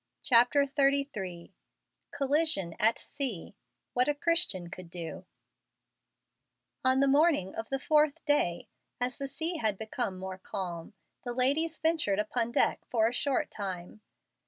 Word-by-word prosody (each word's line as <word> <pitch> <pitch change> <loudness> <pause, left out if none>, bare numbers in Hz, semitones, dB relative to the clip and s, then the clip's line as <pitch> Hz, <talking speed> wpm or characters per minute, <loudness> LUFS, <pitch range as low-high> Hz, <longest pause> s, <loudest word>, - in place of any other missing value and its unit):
CHAPTER 250 +4 +5
XXXIII 275 - -1 0.6
COLLISION 280 - 0
AT 220 +2 +4
SEA 250 - -4 0.4
WHAT 250 +1 +2
A 295 - +1
CHRISTIAN 290 - 0
COULD 180 -2 -9
DO 170 -2 -7 1.6
On 260 +1 +4
the 275 - +4
morning 285 - +3
of 225 - -6
the 270 - 0
fourth 300 +1 +2
day, 180 - +1 0.3
as 245 +2 -2
the 275 - -3
sea 320 +6 -3
had 215 -7 0
become 220 -2 -3
more 190 0 -6
calm, 185 -2 -6 0.3
the 245 -1 -3
ladies 295 +6 +2
ventured 320 -11 +1
upon 230 +2 -1
deck - - +2
for 225 -2 +3
a 235 - -2
short 275 +1 0
time. 190 0 -6
245 Hz, 135 wpm, -30 LUFS, 195-285 Hz, 1.6 s, CHAPTER